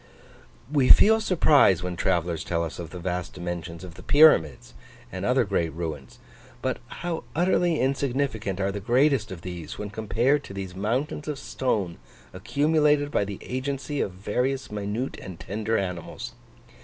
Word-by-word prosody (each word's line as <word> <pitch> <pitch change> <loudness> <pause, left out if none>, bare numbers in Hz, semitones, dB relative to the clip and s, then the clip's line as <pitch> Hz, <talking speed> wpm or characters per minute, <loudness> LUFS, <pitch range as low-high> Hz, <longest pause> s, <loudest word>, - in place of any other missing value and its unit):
We 140 -4 +3
feel 220 +1 +7
surprise 150 - +4
when 90 -1 -3
travellers 85 -2 0
tell 85 -1 -1
us 80 0 -6
of 85 -2 -6
the 90 - -8
vast 90 0 -3
dimensions 85 -1 -6
of 90 -2 -9
the - - -12
Pyramids 145 - +4 0.4
and - - -5
other - - +3
great 85 -1 0
ruins, 80 -6 -5 0.4
but 130 - -1
how 170 +5 -4
utterly 175 -1 +2
insignificant 130 -7 -1
are 100 0 0
the 100 - -4
greatest 120 +1 +2
of 85 -3 -8
these, 85 -4 -7
when 105 -1 -5
compared 120 +7 +1
to 100 - -9
these 95 -2 -6
mountains 125 +10 -2
of 150 -2 -3
stone 105 -11 -2 0.3
accumulated 145 +7 +2
by - - +2
the 100 -1 -6
agency 135 +2 -3
of 95 - -2
various 125 +8 -2
minute 105 +5 -3
and 90 -3 -9
tender 110 +2 -2
animals! 90 -3 -4
105 Hz, 155 wpm, -26 LUFS, 90-140 Hz, 0.4 s, feel